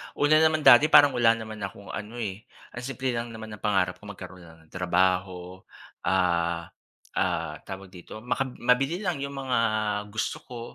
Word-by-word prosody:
Una 150 +1 +4
naman 155 -1 +3
dati 135 +2 +8
parang 145 -2 +7
wala 120 -3 +4
naman 110 -1 -8
akong 100 0 -7
ano, 105 +2 -7
eh, 110 -2 -5 0.2
ang - - -7
simple 130 -1 -2
lang 115 -1 -4
naman 110 -1 -9
ng 105 - -9
pangarap 95 -3 0
ko 105 - -13
magkaroon 95 -3 -10
lang 80 0 -17
ng 80 - -27
trabaho, 90 0 0 0.5
ah, 85 -2 0 0.5
ah, - - -1
tawag 95 -1 -8
dito, 95 +4 -11
maka 130 +2 -1
mabili 135 - 0
lang 180 -6 -1
yung 140 0 -5
mga 130 -2 0 0.5
gusto 110 +2 -3
ko, 120 -2 -8
110 Hz, 175 wpm, -26 LUFS, 95-130 Hz, 0.5 s, dati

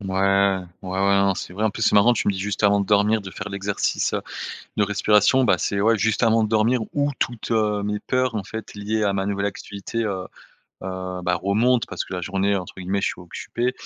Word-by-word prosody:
Ouais. 95 0 +2 0.2
Ouais 90 - -6
ouais. 100 0 +3
Non, 100 -1 +2
c'est 90 - -6
vrai, 105 +4 -2
en 110 - +3
plus, 110 - -6
c'est - - +3
marrant, 105 +4 +6
tu 115 - -2
me - - +3
dis, 95 - -5
juste 100 +1 -3
avant 100 0 +4
de 100 - -2
dormir, 105 +1 +3
de 95 -1 -8
faire 100 - -6
l'exercice, 100 0 -1
heu, - - 0 0.6
de 105 - +4
respiration. 105 +5 +3
Bah, 105 - +3
c'est 100 - -1
ouais 110 +1 +4
juste 110 +3 +1
avant 115 -1 +4
de 105 - -1
dormir 115 +3 +3
où 145 0 +1
toutes, 120 -1 -2
heu, 105 -2 +1
mes 105 0 -2
peurs 130 -2 0
en 100 - -2
fait 110 +2 -7
liées 105 +1 -2
à 100 - +1
ma 95 0 -1
nouvelle 100 0 -1
activité, 100 +3 -4
heu, 95 -3 -3 0.6
heu, 95 -1 -5
bah, 90 0 +2
remontent 115 +5 +2
parce - - -4
que - - -11
la 90 - -3
journée, 95 +2 0
heu, - - +1
entre 90 - -10
guillemets 95 +2 -1
«je - - 0
suis - - -6
occupé» 120 +7 -3
100 Hz, 240 wpm, -23 LUFS, 100-110 Hz, 0.6 s, marrant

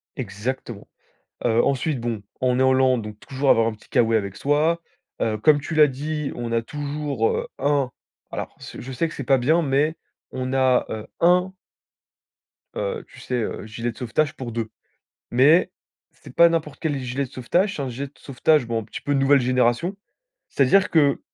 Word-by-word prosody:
Exactement! 115 -1 -5 0.6
Heu 115 0 +3
ensuite, 140 0 0
bon, 115 -3 -3 0.2
on 125 -1 +2
est - - +5
en 130 - +5
Lande, 130 -3 +3
donc 105 -1 -8
toujours 135 +1 -1
avoir 115 0 +5
un - - -2
petit 105 - -20
K-Way 115 -1 +3
avec 100 -2 -2
soi. 155 +4 +1 0.4
Heu, 110 -1 0
comme 145 +7 +4
tu 160 +3 -5
l'as 155 -1 +7
dit, 150 +2 -3
on 120 -1 -4
a 115 0 +1
toujours, 145 -2 -2
heu, - - -2
1 140 -2 +1 0.4
alors - - -5
ce - - -9
je 130 +1 -7
sais 165 +6 0
que - - -10
c'est 140 - -5
pas 135 0 +4
bien, 155 +7 +3
mais 145 +3 +1 0.3
on 130 0 -4
a, 130 -1 +3
heu, 110 -1 -5
1 180 +2 +4 1.2
heu, 480 -3 -3
tu - - -16
sais, 125 - -4
heu, 105 - -5
gilet 115 +2 -4
de 115 - -17
sauvetage 145 +5 0
pour 125 -3 -6
2. 115 -1 -3 0.6
Mais, 145 +8 +5 0.4
c'est - - -15
pas 170 - +7
n'importe 160 -4 -2
quel 145 -3 -1
gilet 130 +2 -2
de 125 - -10
sauvetage, 180 - 0
c'est 145 - -3
un 135 - -3
gilet 135 +4 -4
de 140 - -20
sauvetage, 135 +1 +1
bon, 115 -1 -1
un - - -9
petit - - -8
peu 145 - -1
nouvelle 135 0 +4
génération. 125 - +1 0.5
C'est-à-dire 185 +8 +3
que, 145 -4 +3
130 Hz, 195 wpm, -23 LUFS, 120-150 Hz, 1.2 s, l'as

